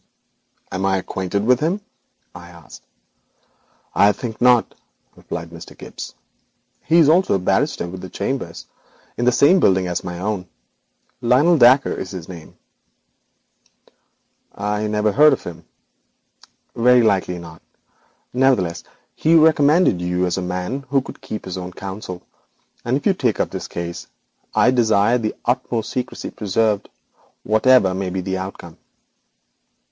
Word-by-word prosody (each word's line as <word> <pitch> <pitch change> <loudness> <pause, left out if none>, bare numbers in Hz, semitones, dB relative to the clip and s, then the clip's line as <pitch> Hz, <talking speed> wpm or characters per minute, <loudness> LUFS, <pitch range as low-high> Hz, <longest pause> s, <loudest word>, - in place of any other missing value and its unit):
'Am 95 - -3
I 95 0 +2
acquainted 95 +2 -3
with 125 +1 +4
him?' 170 +7 0 0.5
I 85 0 -12
asked. 85 -4 -14 1.1
'I 100 +1 +4
think 115 -3 -7
not,' 125 -2 +4 0.4
replied 85 0 -7
Mr. 85 0 -12
Gibbes; - - -9 0.7
'he 165 -2 +4
also 170 - +4
is - - +3
a - - -5
barrister 90 -1 0
with 95 +1 -8
chambers 100 -6 -4 0.5
in 120 - -2
the 125 - +5
same 145 +10 +5
building 95 - +3
as 90 -1 -3
my 90 -1 -6
own. 95 0 -3 0.7
Lionel 130 +8 +4
Dacre 130 +3 +5
is 95 - -6
his 90 -4 -8
name.' 85 -4 -11 2.0
'I 105 +1 -2
never 105 0 +1
heard 150 +5 +6
of - - -4
him.' 85 -1 -9 1.1
'Very 125 +1 +5
likely 95 -4 +1
not. 80 -2 -11 0.7
Nevertheless, 125 -10 +1 0.3
he 160 +2 +2
recommended 155 - +4
you 90 +1 0
as 90 - -1
a 95 - -3
man 90 +9 -4
who 135 0 +2
could - - -11
keep 110 - -7
his 95 0 -5
own 90 0 -7
counsel, 95 -2 -7 0.6
and 125 +3 0
if - - -9
you 200 - +4
take 125 - -1
up - - -1
this - - -5
case 85 0 -6 0.5
I 125 - +4
desire 115 -1 +3
the 110 -2 -3
utmost 120 -2 -1
secrecy 125 - -4
preserved, 105 0 -1 0.5
whatever 110 -2 +4
may 95 0 -3
be 95 +1 -3
the 95 0 -3
outcome.' 95 -3 -8
105 Hz, 140 wpm, -20 LUFS, 90-125 Hz, 2.0 s, heard